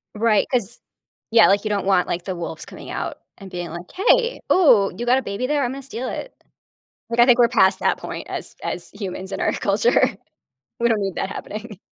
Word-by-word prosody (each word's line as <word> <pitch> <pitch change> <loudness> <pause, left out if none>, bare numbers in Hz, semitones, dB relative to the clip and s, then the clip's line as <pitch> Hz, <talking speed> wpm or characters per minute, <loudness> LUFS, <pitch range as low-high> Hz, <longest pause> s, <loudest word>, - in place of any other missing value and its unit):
Right, 215 -1 +3
'cause 240 -3 -1 0.5
yeah, 225 -1 +7
like, 200 +1 +3
you 215 - -2
don't 205 -2 -1
want, 190 -2 +3
like, 175 0 -3
the 185 - -3
wolves 170 -2 -6
coming - - -11
out - - -4 0.2
and 195 -2 -11
being 175 -2 -5
like, 170 +2 -8
"Hey. 480 +5 +2
Ooh, 235 - +5
you 240 - -3
got 250 +2 +4
a - - 0
baby 200 +2 -3
there? 290 0 +1
I'm 245 - -1
gonna 275 +1 -6
steal 260 -1 -5
it." - - -6 0.8
Like, 235 +1 -2
I 240 - +8
think 245 -1 +5
we're 240 - +7
past 195 -5 +3
that - - +1
point - - -7
as - - -6
as - - -4
humans 190 -1 -6
in - - -4
our - - +1
culture. 475 - +2 0.8
We 235 - +2
don't 225 -2 +1
need 195 -2 -3
that - - -2
happening. 215 -1 -7
220 Hz, 220 wpm, -22 LUFS, 195-250 Hz, 0.8 s, I